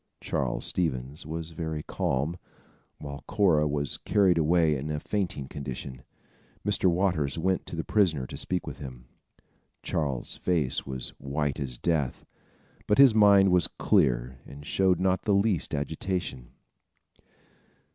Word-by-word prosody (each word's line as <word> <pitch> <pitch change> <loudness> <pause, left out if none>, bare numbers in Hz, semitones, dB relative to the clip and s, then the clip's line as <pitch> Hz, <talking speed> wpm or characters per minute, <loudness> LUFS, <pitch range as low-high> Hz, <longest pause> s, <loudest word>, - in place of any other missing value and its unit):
Charles - - -2
Stevens 75 -3 -2
was 80 +1 -5
very 80 -1 -4
calm, 70 +7 -1 0.6
while 70 -1 -8
Cora 90 -8 +3
was 75 -1 -1
carried 95 -5 +3
away 80 -1 +3
in 70 +3 -4
a 75 -1 -2
fainting 90 -8 -3
condition. 65 -2 -7 0.6
Mr. - - +1
Waters 85 -6 0
went 95 +3 0
to - - -6
the 80 - -2
prisoner 80 -11 +2
to - - -8
speak 90 -1 -2
with - - -7
him. 65 -3 -9 0.8
Charles' 70 -6 -2
face 80 -9 0
was 65 -1 -3
white 70 +1 -2
as 65 -4 -4
death; 75 -6 -1 0.6
but 105 - +3
his 135 -4 +8
mind 100 -3 +6
was 90 -1 +5
clear 60 +1 +1
and 70 +1 -11
showed 95 +2 +2
not 95 0 +1
the 105 - +3
least 100 -7 +1
agitation. 75 -3 -3
80 Hz, 135 wpm, -27 LUFS, 70-90 Hz, 0.8 s, his